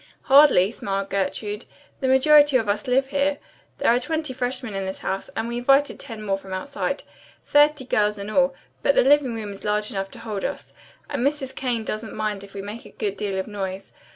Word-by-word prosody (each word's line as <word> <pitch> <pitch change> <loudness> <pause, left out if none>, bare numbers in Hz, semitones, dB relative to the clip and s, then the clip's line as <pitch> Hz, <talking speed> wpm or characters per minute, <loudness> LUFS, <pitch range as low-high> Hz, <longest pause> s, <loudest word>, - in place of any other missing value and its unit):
"Hardly," 270 -9 +6
smiled 195 -3 -3
Gertrude, 200 +2 -2 0.3
"the 265 - -1
majority 290 +1 +6
of 225 -4 -2
us 205 +3 -1
live 265 +2 +2
here. 285 +1 +1 0.4
There - - +3
are 245 - +3
twenty 305 +1 -2
freshmen 250 -2 -3
in 195 -1 -3
this 190 - -4
house, 195 0 -2
and 225 +1 -2
we 235 0 -3
invited 275 +3 +3
ten 225 -5 -7
more 195 -2 -1
from 195 -1 -9
outside. 280 +10 -3 0.4
Thirty 290 -2 +4
girls 210 -3 +1
in 200 0 -6
all, 270 +5 +2 0.3
but 280 - +3
the - - +5
living 275 -3 +4
room 210 -2 -5
is 195 - -12
large 210 +1 0
enough 195 -2 -3
to - - -13
hold 215 -4 -4
us, - - -5 0.3
and 280 -4 -2
Mrs. 280 -2 -1
Kane 245 -4 -2
doesn't 215 +1 -5
mind 215 -2 -2
if 200 0 -14
we 195 - -5
make 215 +3 -7
a - - -13
good 200 -2 -3
deal 200 -2 -3
of 190 - -2
noise. 195 -2 -6
225 Hz, 210 wpm, -24 LUFS, 200-270 Hz, 0.4 s, Hardly